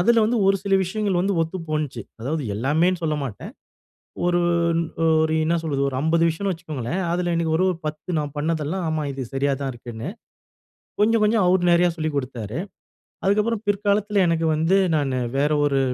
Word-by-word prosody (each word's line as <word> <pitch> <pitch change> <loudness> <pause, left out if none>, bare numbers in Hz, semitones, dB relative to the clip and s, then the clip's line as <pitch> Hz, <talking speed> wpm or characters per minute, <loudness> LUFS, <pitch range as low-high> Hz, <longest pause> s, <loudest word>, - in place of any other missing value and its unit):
அதுல 230 +4 +4
வந்து 235 +1 +1
ஒரு 195 0 +4
சில 195 -1 +1
விஷயங்கள் 195 -1 -1
வந்து 195 +1 +1
ஒத்து 165 +4 -4
போனுச்சு. 150 -5 -2 0.2
அதாவது 150 +5 -2
எல்லாமேன்னு 160 - +1
சொல்ல 155 -2 0
மாட்டேன். 110 -7 -7 0.7
ஒரு 175 0 +2 0.8
ஒரு 160 0 0
என்ன 165 +2 +1
சொல்றது, 145 -4 -2
ஒரு 130 - -6
50 165 +1 +2
விஷயம்னு 195 +4 -2
வச்சுக்கோங்களேன். 155 -1 -4
அதுல 175 0 0
எனக்கு 165 -1 0
ஒரு 185 - +2
ஒரு 180 - -2
10 155 +3 -4
நான் 145 -2 -3
பண்ணதெல்லாம் 160 +3 -1
ஆமா, 155 -1 -1
இது 135 0 -6
சரியா 140 +1 +1
தான் 135 -1 -2
இருக்குன்னு. 120 +3 -7 0.9
கொஞ்ச 220 +2 +4
கொஞ்சம் 210 -1 +3
அவர் 180 0 +3
நெறைய 175 +1 +5
சொல்லிக் 155 -2 -2
கொடுத்தாரு. 125 -2 -4 0.7
அதுக்கப்புறம் 210 +3 +1
பிற்காலத்துல 205 0 +1
எனக்கு 165 -1 +1
வந்து 165 +5 +2 0.2
நான் 140 -3 0 0.2
வேற 145 +2 +2
ஒரு 140 -1 +2
165 Hz, 170 wpm, -23 LUFS, 145-190 Hz, 0.9 s, நெறைய